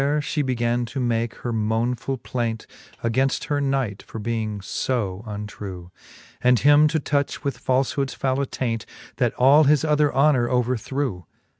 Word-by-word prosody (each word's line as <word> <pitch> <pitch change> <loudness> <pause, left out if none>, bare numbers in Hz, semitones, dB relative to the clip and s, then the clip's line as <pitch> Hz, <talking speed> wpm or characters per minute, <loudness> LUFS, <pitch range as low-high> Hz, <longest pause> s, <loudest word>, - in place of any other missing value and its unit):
There 145 +2 +2
fhe 150 0 -1
began 120 -2 0
to 120 +4 -5
make 115 -2 0
her 120 - -1
monefuH 115 +4 -1
plaint 115 -3 -2 0.4
Againft 130 +4 +1
her 145 -1 +1
knight, 135 -7 -1
for - - -10
being 110 -1 -2
lb 100 0 -2
untrew; 100 -4 -7 0.5
And 125 0 +5
him 145 +4 +6
to 160 +1 0
touch 145 0 -1
with 140 -2 -3
falfhoods 135 +1 0
fovvle 135 0 0
attaint, 120 -4 -3 0.3
That - - +1
all 140 +5 +6
his 150 +2 +4
other 150 -1 +3
honour 135 -3 +3
overthrew. 125 - -1
125 Hz, 150 wpm, -23 LUFS, 115-140 Hz, 0.5 s, him